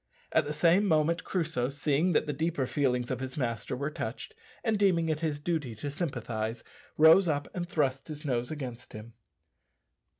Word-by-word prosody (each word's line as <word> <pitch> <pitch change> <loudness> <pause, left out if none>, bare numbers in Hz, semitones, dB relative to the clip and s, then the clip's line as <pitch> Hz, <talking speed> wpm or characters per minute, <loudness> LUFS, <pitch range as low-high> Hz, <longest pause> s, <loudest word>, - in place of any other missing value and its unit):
At - - +3
the 145 - -3
same 170 +6 +4
moment 165 0 +2
Crusoe, 160 -8 -1
seeing 145 +5 +1
that - - +2
the 150 - -2
deeper 160 -1 -1
feelings 125 -3 0
of - - -2
his 130 +1 -6
master 115 -3 -2
were 140 +4 -3
touched, 445 - -5 0.3
and 220 -3 +1
deeming 170 -5 +3
it 155 -1 0
his 155 -3 -1
duty 150 -7 -2
to 140 +7 -5
sympathize, 120 -8 -3 0.3
rose 160 +4 +7
up 145 -2 0
and 175 -1 -4
thrust 135 -5 0
his 155 0 -8
nose 125 -3 -1
against 125 -6 -7
him. 110 +2 -9
150 Hz, 175 wpm, -29 LUFS, 130-165 Hz, 0.3 s, rose